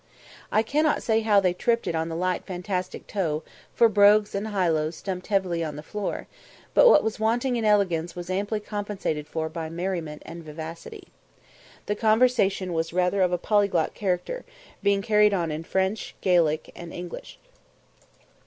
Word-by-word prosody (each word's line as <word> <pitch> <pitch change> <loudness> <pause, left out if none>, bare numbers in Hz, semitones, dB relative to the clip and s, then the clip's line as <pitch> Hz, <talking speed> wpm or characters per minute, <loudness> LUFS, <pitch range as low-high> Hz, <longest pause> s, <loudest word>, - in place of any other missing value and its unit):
I 215 - +3
cannot 300 +6 +1
say 225 -1 +2
that 205 -3 +4
they 180 -1 +3
tripped 230 +5 0
it 175 - -1
"on 160 0 -1
the 165 - -4
light 180 +1 -1
fantastic 180 0 -4
toe," 160 -6 -2 0.3
for 235 - +6
brogues 205 0 +5
and 200 +2 -2
highlows 165 -6 0
stumped 185 -2 -5
heavily 185 -5 0
on 155 -2 -4
the 150 - -8
floor; 210 +2 -4 0.5
but - - +7
what 300 - +6
was 220 -1 -2
wanting 240 +4 +1
in 230 -2 -1
elegance 175 -6 +2
was 175 -1 -6
amply 200 +3 -1
compensated 205 -8 -4
for 160 0 -3
by 160 0 -5
merriment 170 -3 -4
and 170 0 -9
vivacity. 160 +2 -9 0.8
The 205 - -1
conversation 215 -4 +2
was 165 0 -2
rather 180 +2 +1
of 180 -1 +3
a 180 - +1
polyglot 200 -4 +1
character, 195 - -2 0.4
being 200 -1 +2
carried 210 -2 +4
on 170 -4 -1
in 155 +2 -4
French, 190 +5 -2
Gaelic, 165 -4 +2
and 170 -1 -9
English. 175 0 -8
185 Hz, 165 wpm, -25 LUFS, 170-210 Hz, 0.8 s, but